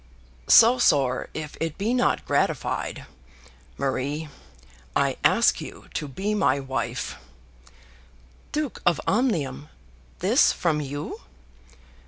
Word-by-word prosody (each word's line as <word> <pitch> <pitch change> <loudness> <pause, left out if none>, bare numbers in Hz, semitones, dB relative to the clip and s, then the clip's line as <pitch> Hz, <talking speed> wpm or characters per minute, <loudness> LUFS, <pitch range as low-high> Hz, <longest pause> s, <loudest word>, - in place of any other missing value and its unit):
"So 240 +3 +7
sore, 135 - +2
if 150 -1 -6
it 165 -1 -3
be 215 +5 0
not 250 0 +1
gratified. - - -1 0.7
Marie, 140 +3 -2 0.7
I - - +2
ask - - +4
you - - -10
to 150 - -3
be 195 +10 -3
my 205 -8 +2
wife." 130 -3 -4 1.3
"Duke 300 -3 -3
of 175 -2 +2
Omnium, 165 - 0 0.5
this - - +4
from 155 -3 0
you!" 145 +1 -6
150 Hz, 105 wpm, -25 LUFS, 135-210 Hz, 1.3 s, So